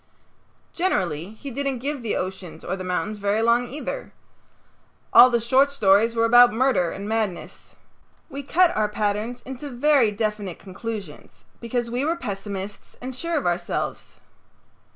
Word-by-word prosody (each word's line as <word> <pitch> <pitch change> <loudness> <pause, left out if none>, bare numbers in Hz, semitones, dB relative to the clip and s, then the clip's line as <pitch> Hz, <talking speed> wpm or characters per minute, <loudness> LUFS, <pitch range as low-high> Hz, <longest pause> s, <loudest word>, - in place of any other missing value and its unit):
Generally 190 - -1
he 275 +5 -8
didn't 275 +1 -2
give 280 +2 -3
the 225 -3 -2
oceans 185 -2 -5
or - - -2
the 185 - -6
mountains 195 +4 -2
very 205 +2 +1
long 235 +1 +3
either. 300 - -6 1.0
All 250 - +10
the 235 -1 +2
short 260 +5 +3
stories 225 -3 +3
were 230 0 +3
about 245 +1 +7
murder 225 -7 +2
and 200 +4 -6
madness. 215 -5 -4 0.5
We 280 -2 -6
cut 345 +6 +3
our 215 -1 +1
patterns 210 +3 -2
into 265 +2 -7
very 270 -1 +3
definite 210 -3 -3
conclusions 205 +2 -8
because 235 0 -3
we 245 +3 -1
were 325 +3 +1
pessimists 200 - -6
and 255 +1 -6
sure 335 +4 -2
of 290 - -2
ourselves. 175 0 -2
230 Hz, 150 wpm, -24 LUFS, 200-260 Hz, 1.0 s, All